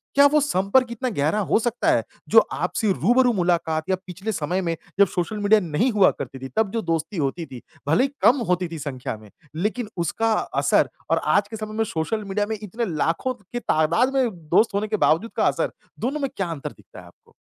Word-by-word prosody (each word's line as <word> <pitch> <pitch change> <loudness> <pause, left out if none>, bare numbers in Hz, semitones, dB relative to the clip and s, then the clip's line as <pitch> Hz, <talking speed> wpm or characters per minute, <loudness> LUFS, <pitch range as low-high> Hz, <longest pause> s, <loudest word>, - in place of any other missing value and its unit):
क्या 280 0 +7
वो 300 +1 +3
संपर्क 250 -1 +2
इतना 250 +2 -2
गहरा 155 +9 +1
हो - - +4
सकता 240 +1 0
है, - - +2 0.3
जो - - +8
आपसे 220 -4 0
रूबरू 245 +8 +3
मुलाकात 170 -4 0
या 190 - +3
पिछले 190 +5 -4
समय 180 0 -1
में 170 -2 -1 0.2
जब 200 - +7
सोशल 180 +4 -3
मीडिया 205 +1 +5
नहीं 175 - 0
हुआ 205 -4 +5
करती 135 - -6
थी 130 0 -7
तब 220 -3 +2
जो 225 +1 -1
दोस्ती 165 +2 -2
होती 155 +3 -1
थी, 130 -5 -10 0.3
भले 160 - +4
ही 275 - +1
कम 260 +3 +6
होती 180 0 +1
थी 165 - -6
संख्या 130 -5 -5
में 105 -1 -16 0.3
लेकिन 210 +6 -2
उसका 225 +6 0
असर - - +1 0.2
और - - +3 0.2
आज 200 - +1
के 220 - -6
समय 215 0 -6
में 225 - +2
सोशल 210 +5 -2
मीडिया 205 +1 -1
में 220 0 -3
इतने 220 +3 -3
लाखों 165 - 0
की 235 +2 -7
तादाद 170 - +2
में 260 -3 +3 0.2
दोस्त 215 +6 +4
होने 205 +2 0
के 215 0 -1
बावजूद 200 +9 +1
का - - +3
असर, - - 0 0.3
दोनों 270 +6 -2
में 275 - 0
क्या 195 - -1
अंतर 150 -2 -5
दिखता 95 -2 -15
है - - -15
आपको? 85 - -21
200 Hz, 220 wpm, -23 LUFS, 165-225 Hz, 0.3 s, जो